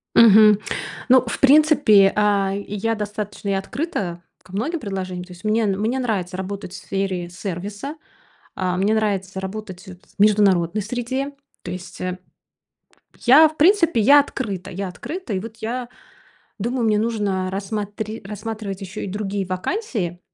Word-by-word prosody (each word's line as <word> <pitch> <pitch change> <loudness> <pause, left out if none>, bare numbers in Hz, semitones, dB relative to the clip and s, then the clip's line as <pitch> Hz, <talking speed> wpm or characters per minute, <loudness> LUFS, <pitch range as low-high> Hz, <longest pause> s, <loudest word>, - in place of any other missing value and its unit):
Мгм. 215 -2 +8 0.5
Ну, 255 0 +6
в 235 - -4
принципе, 275 -9 +6
а, 200 -2 +2
я 205 +2 -2
достаточно 210 -1 -5
и - - +2
открыта 195 - -3 0.2
ко 185 - -18
многим 275 - -2
предложениям. 185 -6 -5
То 180 - -13
есть, 180 +2 -14
мне, 220 +1 +2
мне 215 +6 0
нравится 195 -8 -2
работать 190 -1 -6
в - - -7
сфере 190 -3 -3
сервиса. 205 - -6 0.6
А, 180 -1 -1
мне 200 +4 +2
нравится 195 -3 -1
работать 190 -1 -7
в 185 - -10 0.2
международной 205 -2 +3
среде. 250 +6 -3 0.3
То 175 - -6
есть, 180 0 -8
э, 185 0 -3 1.0
п - - -25
я, 285 +6 +8
в 310 0 -10
принципе, 335 - +4
я 280 +7 +7
открыта. 215 -10 -3
Я 195 +1 -4
открыта. 305 - -6
И 190 - 0
вот 225 +2 -9
я 240 +2 -4 0.7
думаю, 240 +4 -1
мне 210 -1 +3
нужно 205 -5 -1
рассматри 205 +2 -4
рассматривать 210 -1 -5
ещё 195 -1 -7
и - - -3
другие 200 0 -3
вакансии 185 - -3
205 Hz, 150 wpm, -22 LUFS, 190-230 Hz, 1.0 s, Мгм